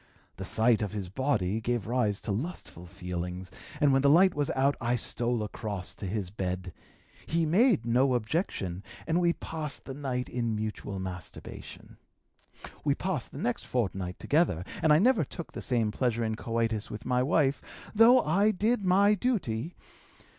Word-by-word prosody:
The - - -5
sight 115 0 +3
of 105 -1 -2
his 100 -4 -4
body 110 -3 0
gave 120 -3 -1
rise 110 -4 0
to 110 - -3
lustful 105 - -5
feelings, 90 0 -5 0.3
and 145 -2 +4
when 135 - +4
the 140 - +4
light 180 +5 +6
was 145 -1 -1
out 135 +2 +3
I 120 +1 +1
stole 120 -1 0
across 105 -3 -4
to 100 - -6
his 95 -2 -3
bed. 90 -2 -4 0.5
He 165 0 +1
made 185 - +3
no 125 +2 +3
objection, 110 - -2 0.2
and 170 +2 +1
we 170 -1 +3
passed 155 -4 -5
the 135 - -6
night 130 -3 -3
in 115 -2 -2
mutual 105 -2 -4
masturbation. 90 -2 -8 0.9
We 145 -2 +2
passed 180 -8 -3
the - - -9
next 120 - -2
fortnight 95 -7 -2
together, 150 - +1 0.2
and 160 - +4
I 150 - +7
never 220 +1 +4
took 170 +4 -8
the - - -6
same 115 -4 +1
pleasure 120 0 0
in 110 -1 -1
coitus 115 -1 -2
with 105 +1 -7
my 125 0 +2
wife, 140 0 +2 0.3
though 235 +4 +7
I 195 +6 +3
did 215 +2 +1
my 195 +3 +5
duty. 180 - -1
120 Hz, 170 wpm, -29 LUFS, 105-160 Hz, 0.9 s, I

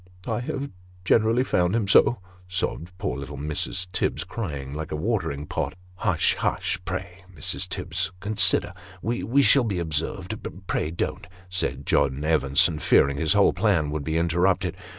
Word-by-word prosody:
" 90 - -21
I - - 0
have 135 +3 -4 0.3
generally 115 +5 +4
found 90 -5 +1
him 110 -4 0
so," 120 +4 +5 0.3
sobbed 90 -2 -3
poor - - -3
little 70 +1 -7
Mrs. 75 +5 -2
Tibbs; 95 - -1
crying 70 -11 -5
like 80 +1 -5
a - - -1
watering 80 -6 -1
pot. - - -3
" - - -25
Hush! - - +2
hush! 95 0 -1
pray 90 +1 -5
Mrs. 65 - -3
Tibbs 95 +2 -2
consider 105 +2 +2 0.3
we 120 +4 +1
shall 135 -1 +5
be 105 -5 -1
observed 80 -2 -2 0.3
pray, 75 - -1
don't! 80 - -3
" 90 0 -23
said 90 - -2
John 70 +2 +1
Evenson, 75 0 +3
fearing 70 -1 +4
his 80 +3 +2
whole 100 -1 +5
plan 85 -6 +1
would 75 -1 -3
be 80 +3 -1
interrupted. 85 +3 +1
90 Hz, 165 wpm, -25 LUFS, 75-100 Hz, 0.3 s, so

